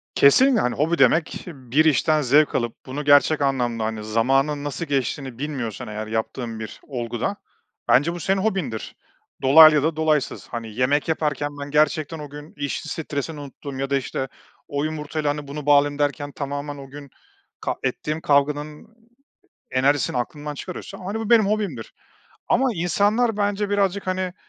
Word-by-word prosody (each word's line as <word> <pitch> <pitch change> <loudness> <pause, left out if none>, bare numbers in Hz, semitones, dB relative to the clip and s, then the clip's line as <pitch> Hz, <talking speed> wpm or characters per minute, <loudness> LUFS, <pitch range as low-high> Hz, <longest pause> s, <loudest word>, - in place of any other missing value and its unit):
Kesinle, 250 - +5
hani, 125 - 0
hobi 165 +4 +1
demek: 160 0 +2
Bir 140 -1 0
işten 155 +1 +3
zevk 145 +3 +3
alıp 120 -2 -3
bunu 140 +3 -5
gerçek 145 +1 +5
anlamda, 120 -5 0
hani, 110 -1 -4
zamanın 135 +7 +1
nasıl 145 +4 -4
geçtiğini 135 -3 -2
bilmiyorsan 130 -9 -4
eğer 105 0 -5
yaptığın 110 +1 -3
bir 110 - -8
olguda, 120 - -3 0.5
bence 145 +7 +4
bu 175 - -6
senin 190 +4 0
hobindir. 180 - -2 0.5
Dolaylı 155 +3 +8
ya 145 - +2
da 160 +1 0
dolaysız. 155 -2 0
Hani, 115 -2 -6
yemek 140 +4 +1
yaparken 150 -2 -1
ben 145 0 -6
gerçekten 155 +1 +1
o 150 -1 -8
gün 150 +2 -11
iş 145 -1 -3
stresini 155 -1 -4
unuttuğum 140 -1 -8
ya 135 0 -2
da, 140 - +2
işte, 135 0 -3 0.4
“O 145 0 -2
yumurtayla, 155 -1 -2
hani, 145 0 -3
bunu 145 +1 -6
bağlayayım.“ 145 0 +4
derken 145 0 -1
tamamen 145 +1 -5
o 135 -1 -10
gün 140 0 -10 0.5
ka - - -2
ettiğim 155 +1 -2
kavganın 150 +2 0 0.8
enerjisini 135 0 +1
aklından 145 +4 -4
çıkarıyorsa, 185 +5 -8
hani, 205 +4 -3
bu 225 +1 -4
benim 225 -3 +6
hobimdir. 210 -1 -2 0.6
Ama 260 +3 +3
insanlar 205 +6 +1
bence 205 0 0
birazcık, 200 -1 0
hani, 185 -1 -1
145 Hz, 160 wpm, -23 LUFS, 135-160 Hz, 0.8 s, Dolaylı